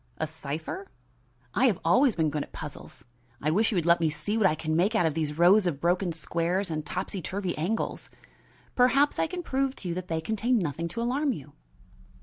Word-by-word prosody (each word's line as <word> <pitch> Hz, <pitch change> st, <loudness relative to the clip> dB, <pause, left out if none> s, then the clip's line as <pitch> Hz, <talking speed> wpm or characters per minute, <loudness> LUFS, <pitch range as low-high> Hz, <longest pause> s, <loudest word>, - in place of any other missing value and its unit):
"A 160 Hz, -, -1 dB
cipher?" 160 Hz, +4 st, -6 dB, 0.7 s
"I 260 Hz, -, +4 dB
have 210 Hz, -8 st, +2 dB
always 250 Hz, +8 st, +4 dB
been 160 Hz, -3 st, +1 dB
good 150 Hz, 0 st, -2 dB
at -, -, -7 dB
puzzles. -, -, -9 dB, 0.4 s
I 150 Hz, -, 0 dB
wish 215 Hz, +7 st, +3 dB
you 220 Hz, -, -2 dB
would 170 Hz, -3 st, +1 dB
let 170 Hz, 0 st, +5 dB
me 165 Hz, -2 st, +2 dB
see 155 Hz, +8 st, -3 dB
what 215 Hz, -4 st, +4 dB
I 155 Hz, -, +1 dB
can 155 Hz, 0 st, -2 dB
make 195 Hz, +7 st, +2 dB
out 215 Hz, -, +3 dB
of 160 Hz, -, +1 dB
these 150 Hz, -1 st, -2 dB
rows 185 Hz, +3 st, +6 dB
of 145 Hz, -6 st, -2 dB
broken 175 Hz, +2 st, +1 dB
squares 170 Hz, +3 st, -1 dB
and 155 Hz, -1 st, -2 dB
topsy 185 Hz, +3 st, -4 dB
turvy 190 Hz, 0 st, -3 dB
angles. 185 Hz, +9 st, -2 dB, 0.6 s
Perhaps 270 Hz, +4 st, +3 dB
I -, -, +2 dB
can 355 Hz, +1 st, -5 dB
prove 270 Hz, -2 st, -1 dB
to 180 Hz, -, -6 dB
you -, -, -1 dB
that 180 Hz, +1 st, -5 dB
they 160 Hz, -2 st, -1 dB
contain 220 Hz, +8 st, 0 dB
nothing 170 Hz, -3 st, -2 dB
to 230 Hz, +7 st, -4 dB
alarm 270 Hz, +3 st, +1 dB
you." 145 Hz, -, -10 dB
175 Hz, 215 wpm, -28 LUFS, 160-220 Hz, 0.7 s, rows